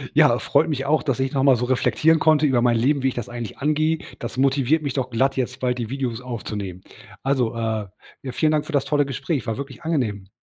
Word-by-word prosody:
Ja, - - +5
freut 160 - +2
mich 135 -3 -2
auch, 155 +3 +2
dass 135 -4 -1
ich 135 0 0
noch 135 - +1
mal 135 -1 +5
so 125 +1 -1
reflektieren 155 +5 +2
konnte 155 -1 +4
über 130 -4 +3
mein 120 -1 +3
Leben, 135 +5 +2
wie 135 - +1
ich 130 - -1
das 120 - -5
eigentlich 120 -3 -6
angehe. 155 +2 +1 0.2
Das 120 +1 -6
motiviert 135 +3 +2
mich 140 -3 -2
doch 130 -2 -2
glatt, 135 +3 +1
jetzt 125 0 -2
bald 125 -1 -1
die 115 -2 -3
Videos 130 -3 -3
aufzunehmen. 105 -7 -6 0.4
Also, 130 -4 0
äh, 110 -2 -2 0.3
ja 130 - -5
vielen 155 +5 +1
Dank 150 -1 +1
für 165 - -7
das 140 -2 +2
tolle 145 -1 +2
Gespräch. 140 - -3
War 110 - -2
wirklich 140 -1 -7
angenehm. 115 - -1
130 Hz, 235 wpm, -23 LUFS, 120-145 Hz, 0.4 s, Ja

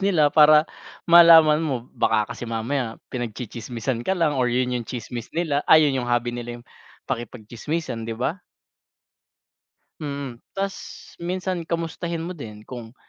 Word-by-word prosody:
nila 175 -7 +3
para 155 0 +7 0.4
malaman 165 -2 +8
mo 130 -7 -2
baka 110 +1 +1
kasi 120 0 -7
mamaya 115 +1 -2 0.2
pinagtsi-tsismisan 120 0 -4
ka 190 - +1
lang 155 -5 +1
or 125 - +2
yun 125 +1 0
yung 120 -2 -3
tsismis 120 0 -6
nila 155 -4 +1
ay 155 -1 +8
yun 135 -1 0
yung - - -6
hobby 120 0 0
nila 120 0 -6
yung - - -22 0.4
pakikipag-tsismisan, 120 +2 -4
'di 115 - -4
ba? 145 - -2 1.6
Mm, 140 -5 -5 0.2
tapos 195 0 -2 0.4
minsan 180 -1 -3
kamustahin 170 0 -3
mo 175 - -5
din 110 -10 -9
kung, 120 0 -9
130 Hz, 140 wpm, -23 LUFS, 120-165 Hz, 1.6 s, malaman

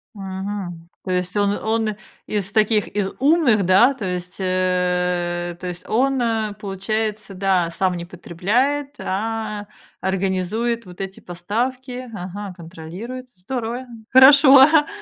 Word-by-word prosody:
Мгм. 190 -3 -6 0.2
То 185 - -3
есть 180 +2 -1
он 200 0 +2
он 220 -1 -1 0.3
из 200 -2 -2
таких, 215 -1 +2
из 200 -2 -1
умных, 275 - +4
да, 215 +9 +5
то 225 -7 -6
есть, 180 0 -4
э, 180 -1 0
то 180 - -6
есть 175 0 -7
он, 265 +3 +1
а, 220 -3 0
получается, 210 +1 -3
да, 185 -3 +1
сам 185 +1 0
не 170 - -5
потребляет, 245 - -1
а 210 +1 -3 0.3
организует 195 +5 -1
вот 180 0 -13
эти 195 0 -6
поставки, 250 +8 -4
ага, 190 +1 -6
контролирует. 185 +10 -8
Здорово, 240 +5 -4 0.2
хорошо, 270 +1 +8
ага. 295 +2 +6
205 Hz, 130 wpm, -21 LUFS, 180-235 Hz, 0.3 s, хорошо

